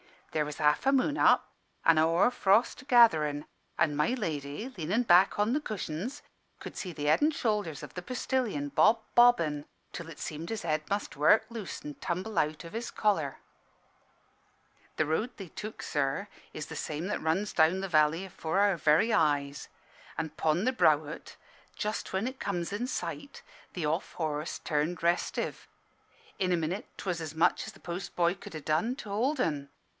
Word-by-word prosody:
There 155 Hz, -1 st, 0 dB
was 150 Hz, 0 st, -6 dB
half 150 Hz, -, +2 dB
a 270 Hz, -, +5 dB
moon 275 Hz, +2 st, +2 dB
up -, -, +5 dB, 0.4 s
an' 165 Hz, -1 st, +6 dB
a 155 Hz, -, +5 dB
hoar 165 Hz, +9 st, +3 dB
frost 235 Hz, +4 st, +2 dB
gatherin', 155 Hz, -, +5 dB, 0.3 s
an' 150 Hz, -3 st, +2 dB
my 150 Hz, +11 st, +2 dB
lady, 155 Hz, -, -4 dB
lean 165 Hz, -2 st, -4 dB
in' 235 Hz, +4 st, +3 dB
back 185 Hz, -3 st, +5 dB
on 210 Hz, +2 st, +2 dB
the 295 Hz, -, +2 dB
cushions, 215 Hz, -, -5 dB, 0.4 s
could -, -, -8 dB
see 185 Hz, -, -4 dB
the 150 Hz, -1 st, -5 dB
head 150 Hz, -, +4 dB
and 300 Hz, +1 st, +3 dB
shoulders 210 Hz, -, -1 dB
of -, -, -9 dB
the 180 Hz, -, -5 dB
postillion 230 Hz, -, -2 dB
bob 220 Hz, +10 st, +4 dB
bobbing, 165 Hz, -12 st, +4 dB, 0.3 s
till 170 Hz, -1 st, -7 dB
it 155 Hz, -, -10 dB
seemed 160 Hz, +2 st, -5 dB
his 225 Hz, -2 st, -3 dB
head 155 Hz, -2 st, 0 dB
must 200 Hz, -6 st, -2 dB
work 210 Hz, +10 st, +5 dB
loose 225 Hz, -6 st, -6 dB
and 150 Hz, -1 st, -9 dB
tumble 185 Hz, +2 st, -2 dB
out 155 Hz, +2 st, -1 dB
of 165 Hz, -, -10 dB
his 235 Hz, +2 st, -4 dB
collar. 165 Hz, -10 st, 0 dB, 1.6 s
"The 155 Hz, -, +1 dB
road 160 Hz, +11 st, -1 dB
they 195 Hz, -4 st, -9 dB
took, 215 Hz, +7 st, -7 dB
sir, 145 Hz, +8 st, -1 dB, 0.2 s
is 155 Hz, -, -6 dB
the -, -, -7 dB
same 155 Hz, +2 st, -3 dB
that 210 Hz, -, -2 dB
runs 180 Hz, +6 st, 0 dB
down 165 Hz, +4 st, +3 dB
the 195 Hz, -, -4 dB
valley 155 Hz, +2 st, +3 dB
afore 185 Hz, -1 st, -2 dB
our 200 Hz, -3 st, +3 dB
very 160 Hz, +9 st, +3 dB
eyes. 145 Hz, -2 st, +1 dB, 0.5 s
An' 160 Hz, -, -2 dB
'pon 155 Hz, +4 st, 0 dB
the 255 Hz, -, +2 dB
brow 155 Hz, -, +4 dB
o't, 155 Hz, -, -9 dB, 0.4 s
just 210 Hz, +1 st, -3 dB
when 190 Hz, +3 st, 0 dB
it 260 Hz, +1 st, -5 dB
comes 175 Hz, -3 st, -2 dB
in 220 Hz, +5 st, -2 dB
sight, 170 Hz, -, -5 dB, 0.3 s
the 175 Hz, -4 st, -3 dB
off 160 Hz, +5 st, -1 dB
horse 155 Hz, -1 st, -3 dB
turned 155 Hz, +3 st, -1 dB
restive. 170 Hz, +1 st, -1 dB, 0.7 s
In 185 Hz, -1 st, +1 dB
a -, -, +2 dB
minute 170 Hz, +5 st, -3 dB
'twas 180 Hz, -3 st, -3 dB
as 160 Hz, -1 st, -6 dB
much 160 Hz, -, +2 dB
as -, -, -8 dB
the -, -, -18 dB
post 175 Hz, +1 st, -6 dB
boy 170 Hz, 0 st, +3 dB
could 175 Hz, -, -11 dB
ha' 155 Hz, -, -6 dB
done 165 Hz, -, +1 dB
to 230 Hz, -6 st, -9 dB
hold 255 Hz, +9 st, 0 dB
'en. 145 Hz, -, -1 dB
170 Hz, 190 wpm, -30 LUFS, 155-210 Hz, 1.6 s, an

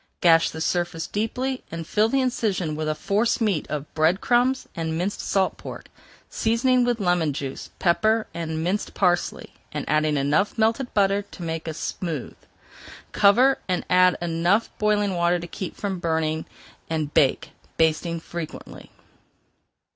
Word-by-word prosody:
Gash 165 Hz, -1 st, +5 dB
the 160 Hz, -, -7 dB
surface 175 Hz, -1 st, -1 dB
deeply 250 Hz, +5 st, -2 dB
and 165 Hz, 0 st, -5 dB
fill 215 Hz, +6 st, +2 dB
the 270 Hz, +2 st, +2 dB
incision 200 Hz, -10 st, -1 dB
with 155 Hz, 0 st, -2 dB
a 155 Hz, -, 0 dB
force 205 Hz, +9 st, +1 dB
meat 205 Hz, -9 st, 0 dB
of 150 Hz, 0 st, -5 dB
bread 160 Hz, +4 st, +2 dB
crumbs 250 Hz, +2 st, +2 dB
and 160 Hz, -1 st, -2 dB
minced 185 Hz, +4 st, -2 dB
salt 190 Hz, -1 st, 0 dB
pork, -, -, -9 dB, 0.4 s
seasoning 245 Hz, +3 st, +2 dB
with 240 Hz, -1 st, 0 dB
lemon 175 Hz, -6 st, +1 dB
juice, 135 Hz, -1 st, -6 dB
pepper, 215 Hz, +5 st, +2 dB
and 160 Hz, -1 st, -3 dB
minced 190 Hz, +5 st, -2 dB
parsley, 175 Hz, -2 st, 0 dB, 0.2 s
and -, -, -4 dB
adding 155 Hz, 0 st, +2 dB
enough 145 Hz, +9 st, +1 dB
melted 225 Hz, +3 st, +1 dB
butter 200 Hz, 0 st, +3 dB
to 200 Hz, -3 st, -11 dB
make 165 Hz, 0 st, -4 dB
smooth. 160 Hz, -2 st, -4 dB, 0.8 s
Cover, 250 Hz, +7 st, +5 dB
add 180 Hz, 0 st, +3 dB
enough 175 Hz, +6 st, +1 dB
boiling 210 Hz, -2 st, +2 dB
water 175 Hz, 0 st, +2 dB
to 170 Hz, -, -6 dB
keep 175 Hz, +1 st, -6 dB
from 195 Hz, -3 st, -3 dB
burning, 160 Hz, -1 st, -1 dB, 0.4 s
and 155 Hz, -2 st, -2 dB
bake, 135 Hz, -, +2 dB, 0.3 s
basting 165 Hz, +1 st, +1 dB
frequently. 165 Hz, -1 st, -8 dB
175 Hz, 145 wpm, -24 LUFS, 160-210 Hz, 0.8 s, Gash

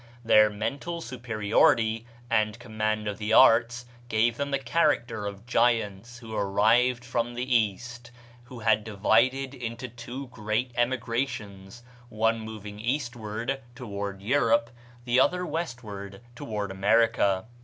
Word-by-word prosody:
Their 110 Hz, -1 st, +6 dB
mental 140 Hz, +11 st, -4 dB
superiority 115 Hz, -3 st, +1 dB, 0.2 s
and 110 Hz, -1 st, +1 dB
command 110 Hz, -2 st, -2 dB
of 105 Hz, -1 st, -4 dB
the 105 Hz, +1 st, -1 dB
arts 120 Hz, +2 st, +5 dB, 0.2 s
gave 115 Hz, +1 st, +2 dB
them 140 Hz, +2 st, -3 dB
the 140 Hz, -, +1 dB
character 120 Hz, -5 st, 0 dB
of 100 Hz, +2 st, -8 dB
giants 115 Hz, -2 st, 0 dB
who 115 Hz, -2 st, -10 dB
arrived 115 Hz, +5 st, +2 dB
from 120 Hz, -1 st, -2 dB
the 125 Hz, +1 st, -2 dB
East; 120 Hz, +3 st, -1 dB, 0.4 s
who 125 Hz, -1 st, -10 dB
had 110 Hz, -1 st, +3 dB
divided 115 Hz, +6 st, +1 dB
into 120 Hz, -1 st, -6 dB
two 120 Hz, +3 st, -8 dB
great 110 Hz, +2 st, -2 dB
emigrations, 120 Hz, -4 st, -3 dB, 0.3 s
one 115 Hz, +1 st, +1 dB
moving 105 Hz, -2 st, -8 dB
eastward 120 Hz, 0 st, -3 dB
(toward 100 Hz, -5 st, -6 dB
Europe), 115 Hz, -1 st, +2 dB, 0.3 s
the 125 Hz, +1 st, +3 dB
other 180 Hz, +6 st, +2 dB
westward 110 Hz, -, -6 dB
(toward 105 Hz, -4 st, -4 dB
America). 100 Hz, -1 st, +2 dB
115 Hz, 125 wpm, -27 LUFS, 105-125 Hz, 0.4 s, Their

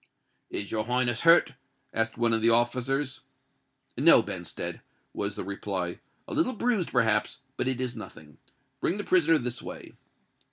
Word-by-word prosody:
"Is 100 Hz, -, -5 dB
your 110 Hz, -1 st, -1 dB
Highness 120 Hz, -1 st, 0 dB
hurt?" 165 Hz, -4 st, +6 dB, 0.4 s
asked 115 Hz, 0 st, -1 dB
one 115 Hz, -1 st, +2 dB
of 110 Hz, -, +3 dB
the 115 Hz, -, +4 dB
officers. 125 Hz, +4 st, +1 dB, 0.7 s
"No, -, -, +6 dB
Benstead," -, -, -6 dB, 0.3 s
was -, -, -2 dB
the -, -, -4 dB
reply: 95 Hz, -2 st, -4 dB, 0.3 s
"a -, -, -6 dB
little 310 Hz, -5 st, +1 dB
bruised, 225 Hz, -5 st, 0 dB
perhaps—but 125 Hz, +3 st, 0 dB
it 130 Hz, -1 st, -1 dB
is 125 Hz, -1 st, -3 dB
nothing. 80 Hz, -, -11 dB, 0.4 s
Bring 190 Hz, -, 0 dB
the 205 Hz, -, -3 dB
prisoner 165 Hz, -4 st, +4 dB
this 125 Hz, -2 st, -4 dB
way." -, -, -9 dB
125 Hz, 150 wpm, -27 LUFS, 115-145 Hz, 0.7 s, hurt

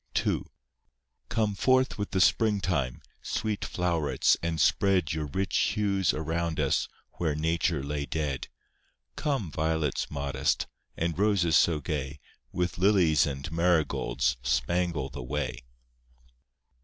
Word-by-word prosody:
II -, -, +1 dB, 0.9 s
Come 110 Hz, -2 st, +1 dB
forth 130 Hz, +3 st, +2 dB
with 100 Hz, -, -2 dB
the 95 Hz, -, +1 dB
spring 105 Hz, +2 st, +3 dB
time, 70 Hz, -10 st, -1 dB, 0.2 s
Sweet 110 Hz, -2 st, -2 dB
flow'rets, 85 Hz, -4 st, +1 dB
and 85 Hz, -1 st, -2 dB
spread 95 Hz, -5 st, +3 dB
Your 75 Hz, -1 st, -2 dB
rich 95 Hz, +7 st, -2 dB
hues 100 Hz, -5 st, +2 dB
around 80 Hz, +1 st, -2 dB
us 70 Hz, -3 st, +1 dB, 0.3 s
Where 80 Hz, -4 st, 0 dB
nature 80 Hz, -1 st, 0 dB
lay 70 Hz, 0 st, -3 dB
dead; 70 Hz, -2 st, -2 dB, 0.7 s
Come, 135 Hz, -, -1 dB
violets 80 Hz, -2 st, -1 dB
modest, 70 Hz, -2 st, -1 dB, 0.3 s
And 85 Hz, +1 st, -1 dB
roses 100 Hz, -6 st, +3 dB
so 80 Hz, -3 st, +4 dB
gay, 75 Hz, -2 st, -4 dB, 0.3 s
With 90 Hz, -4 st, -2 dB
lilies 90 Hz, -6 st, +4 dB
and 70 Hz, +3 st, -5 dB
marigolds, 75 Hz, -7 st, +1 dB
Spangle 70 Hz, +4 st, 0 dB
the -, -, -7 dB
way. 65 Hz, +2 st, -3 dB
80 Hz, 120 wpm, -28 LUFS, 70-95 Hz, 0.9 s, so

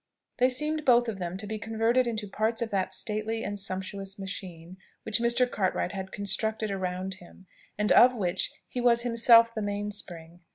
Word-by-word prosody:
They 255 Hz, +1 st, +5 dB
seemed 305 Hz, +4 st, 0 dB
both 240 Hz, -2 st, +4 dB
of 210 Hz, -4 st, -4 dB
them 175 Hz, 0 st, -4 dB
to 200 Hz, -, -7 dB
be 215 Hz, +1 st, -4 dB
converted 225 Hz, +3 st, +1 dB
into 220 Hz, -3 st, -3 dB
parts 220 Hz, +3 st, -1 dB
of 225 Hz, -, -6 dB
that 195 Hz, -2 st, 0 dB
stately 220 Hz, +1 st, -3 dB
and 205 Hz, 0 st, -4 dB
sumptuous 195 Hz, +1 st, -4 dB
machine 185 Hz, -3 st, -8 dB, 0.3 s
which 220 Hz, 0 st, 0 dB
Mr. 235 Hz, +1 st, +3 dB
Cartwright 190 Hz, -5 st, -1 dB
had 190 Hz, -1 st, -6 dB
constructed 210 Hz, +2 st, -2 dB
around 190 Hz, 0 st, -3 dB
him, 180 Hz, +2 st, -16 dB, 0.3 s
and 210 Hz, +1 st, 0 dB
of 250 Hz, +1 st, +7 dB
which 185 Hz, -4 st, -1 dB, 0.2 s
he 250 Hz, -, -4 dB
was 235 Hz, -1 st, +3 dB
himself 230 Hz, -1 st, +5 dB
the 220 Hz, -, -3 dB
main 205 Hz, 0 st, -3 dB
spring. 175 Hz, -4 st, -7 dB
210 Hz, 180 wpm, -28 LUFS, 190-230 Hz, 0.3 s, of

